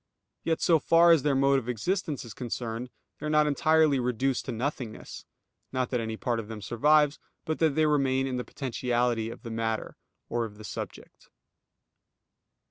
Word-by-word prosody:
Yet 165 -1 0
so 165 -2 +4
far 170 +3 +5
as 165 -3 +6
their 140 0 +1
mode 135 0 +4
of 125 -1 -8
existence 155 - -2
is 115 - -9
concerned, 120 0 -4 0.3
they 150 - -4
are - - -1
not 150 0 +4
entirely 155 -1 +3
reduced 125 +1 0
to - - -3
nothingness; 120 -1 -5 0.5
not 130 -2 -1
that 125 - +1
any 110 -1 -3
part 120 0 -1
of 110 - -6
them 110 -1 -7
survives, 145 +8 +3 0.3
but 155 - -2
that 160 -4 +2
they 155 - +3
remain 135 -3 +2
in 130 -2 -2
the 125 - -2
potentiality 120 -3 -1
of - - -10
the 115 - -6
matter, 110 0 -3 0.3
or 120 0 -1
of 105 -2 -7
the 110 - -11
subject. - - -8
130 Hz, 180 wpm, -28 LUFS, 115-150 Hz, 0.5 s, as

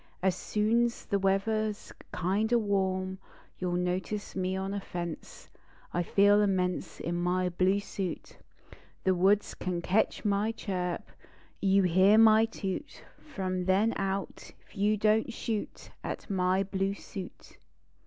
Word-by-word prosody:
As 190 -2 +3
soon 215 +5 +1
s 235 - -5
the 200 - 0
weather 195 +3 +1
s 210 -1 -6 0.2
kind 200 +6 0
o 240 - +5
warm 190 -3 -1 0.4
You 180 - -1
ll - - -1
notice 180 +4 -2
me 185 0 -1
on 195 +1 -3
a 200 - -2
fence. 175 -3 -7 0.4
I 175 - +1
feel 205 +4 +4
immense 185 -3 -1
In 170 - -3
my 180 +1 +1
bine 185 +3 +2
suit. 195 -3 -5 0.6
The 190 - +3
woods 195 +3 +2
can 180 -1 -3
ketch 210 +5 +1
my 205 +2 +1
chirp; 180 -5 -3 0.6
You 195 0 +4
hear 185 +4 +5
my 220 0 +7
toot 210 +3 -5 0.3
r 195 - -2
rom 185 -1 -1
then 200 +5 +3
out 195 0 -2
T - - -14 0.3
you 210 +1 +3
don 215 +1 +3
t - - -7
shoot 225 -2 -4
At - - -5
my 185 0 +2
blue 195 0 -1
suit. 190 -2 -10
195 Hz, 155 wpm, -29 LUFS, 185-210 Hz, 0.6 s, my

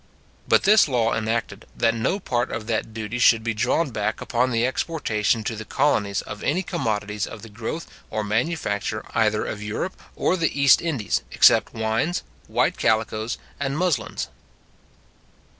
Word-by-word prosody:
But - - +4
this 210 -1 +6
law 120 -4 +1
enacted, 110 -1 -2
that 115 -1 +3
no 115 - 0
part 120 -8 -1
of 110 - -4
that 110 -1 -2
duty 110 +2 -4
should 115 -2 +5
be 115 0 -1
drawn 125 +7 +1
back 105 -1 -2
upon 125 +1 0
the 115 -1 +1
exportation 115 -6 0
to 110 - -3
the 110 - -6
colonies 105 -6 +1
of - - -8
any 175 +7 0
commodities 105 - -2
of 110 - -9
the 115 - -9
growth 115 +10 -5 0.2
or 110 0 -2
manufacture 110 -2 -1
either 110 -2 +2
of 105 - -5
Europe 105 - -3 0.2
or - - +1
the 165 -5 -1
East 140 -3 +6
Indies, 145 -11 -1
except - - +5
wines, 110 +10 0 0.2
white - - +1
calicoes, 110 +1 0 0.2
and 140 0 -1
muslins. 160 -10 -1
115 Hz, 160 wpm, -24 LUFS, 110-140 Hz, 0.2 s, this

